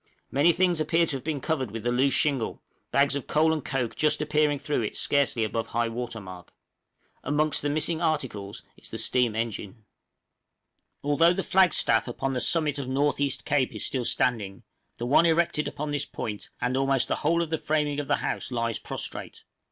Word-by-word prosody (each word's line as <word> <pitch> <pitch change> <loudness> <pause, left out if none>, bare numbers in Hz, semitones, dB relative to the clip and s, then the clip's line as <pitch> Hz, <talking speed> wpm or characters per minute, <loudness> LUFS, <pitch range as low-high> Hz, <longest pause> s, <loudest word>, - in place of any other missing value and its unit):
Many 145 +6 +4
things 175 -1 +1
appear 165 +2 +2
to 145 -4 -2
have 130 - -12
been 155 -4 -3
covered 135 -6 -1
with 115 +2 -6
the 120 - 0
loose 130 +2 +3
shingle, 135 -6 0 0.3
bags 140 0 +2
of 140 - -4
coal 160 +1 +3
and 155 -4 -3
coke 125 -3 -2
just 155 -1 +2
appearing 150 -1 +1
through 145 -1 -1
it 110 - -3
scarcely 140 -5 +1
above 115 +1 -2
high 115 0 -1
water 120 0 -5
mark. 90 -3 -11 0.7
Amongst 150 +2 +1
the 145 - -1
missing 155 +2 0
articles 120 - -2
is - - -9
the 110 - -6
steam 115 0 +1
engine. 110 -1 -4 1.2
Although 155 +4 +4
the 195 +1 -2
flag 190 -2 +4
staff 115 -5 +2
upon 135 +2 -3
the 125 - -1
summit 150 0 +2
of 135 - -4
North 140 +3 +1
East 140 -2 0
Cape 140 -3 +1
is - - -1
still 130 -2 -1
standing, 110 -6 +1 0.3
the 120 - -4
one 145 +7 +5
erected 165 -2 +1
upon 150 0 -4
this 145 -1 -1
point 105 -2 -5
and 125 +1 -1
almost 135 -1 +2
the - - -1
whole 170 +3 +1
of 165 - -7
the 160 - 0
framing 150 -1 0
of 145 - -4
the - - +3
house - - -3
lies 115 -2 -1
prostrate. - - -5
140 Hz, 200 wpm, -26 LUFS, 120-155 Hz, 1.2 s, one